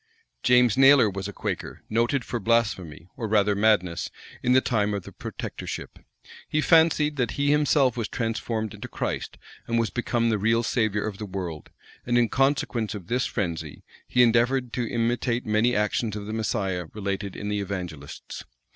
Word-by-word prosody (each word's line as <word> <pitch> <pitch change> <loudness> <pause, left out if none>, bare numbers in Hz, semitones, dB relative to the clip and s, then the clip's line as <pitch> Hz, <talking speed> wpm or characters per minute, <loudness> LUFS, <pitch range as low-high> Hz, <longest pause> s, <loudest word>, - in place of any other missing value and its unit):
James 125 -2 +4
Naylor 135 -5 +7
was 95 0 -4
a - - -5
Quaker, - - -5
noted 120 +4 0
for 120 - -3
blasphemy, 100 -8 0
or 115 - -4
rather 105 -1 +3
madness, 100 -5 +2 0.3
in 125 - +2
the 130 - +7
time 105 -5 0
of 100 - -4
the - - -10
protectorship. - - -7 0.5
He 155 - +1
fancied, 155 -2 +4
that 125 -4 0
he 140 0 +2
himself 145 -4 +3
was 115 -3 -2
transformed 115 -1 -2
into 105 +4 -8
Christ, - - -4 0.3
and 115 - 0
was 115 -2 +1
become 120 -1 0
the 110 - 0
real 115 +3 +2
savior 110 -3 0
of 105 -2 -5
the 105 - -5
world; 90 -5 -6 0.3
and 120 0 +1
in 120 -2 +3
consequence 130 -6 0
of 100 -1 -9
this 125 +1 +1
frenzy, 85 -7 -4 0.2
he 125 - +4
endeavored 120 +1 +2
to 120 -2 -2
imitate 120 +1 0
many 110 +3 +2
actions 105 +1 0
of 105 -1 -5
the 110 - -5
Messiah 95 -6 -2
related 100 -1 -3
in 105 - -4
the 105 0 -1
evangelists. 90 -7 -6
115 Hz, 175 wpm, -25 LUFS, 100-125 Hz, 0.5 s, Naylor